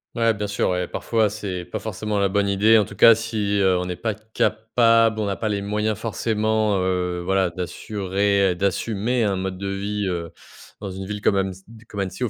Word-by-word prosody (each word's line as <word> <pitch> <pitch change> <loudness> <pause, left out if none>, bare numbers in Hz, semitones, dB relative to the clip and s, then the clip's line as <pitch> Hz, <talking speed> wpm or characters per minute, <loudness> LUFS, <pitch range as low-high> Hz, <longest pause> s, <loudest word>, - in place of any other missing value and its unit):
Ouais, 115 -1 +3
bien 105 - -3
sûr, 100 0 0
ouais. 90 -1 -1
Parfois, 110 -2 0
c'est 95 -4 -5
pas - - -5
forcément 105 -1 -3
la 100 -1 +2
bonne 100 +1 +1
idée, 105 +3 +4
en 105 - +3
tout 100 - -11
cas 115 +3 +8
si, 110 -2 -1
heu, 95 -2 +3
on 90 - -2
n'est 90 - -3
pas 110 +4 -2
capable, 110 +1 +2
on 105 - 0
n'a 100 -1 -1
pas 110 - -2
les 100 -1 -2
moyens 105 +1 -1
forcément, 110 -2 0
heu, 90 -1 -1
voilà, 95 0 +1
d'assurer 100 +2 0
d'assumer 105 +5 -1
un 100 -2 +1
mode 95 0 -3
de 100 +1 -4
vie, 100 +1 -2
heu, 85 -2 -3 0.5
dans 100 -2 -5
une 95 +1 -7
ville 105 0 -4
comme 105 - +2
amessi 95 -1 -2 0.3
comme 100 - -6
Annecy, 95 +5 -5
heu, 125 - +2
même - - -6
100 Hz, 215 wpm, -23 LUFS, 95-110 Hz, 0.5 s, cas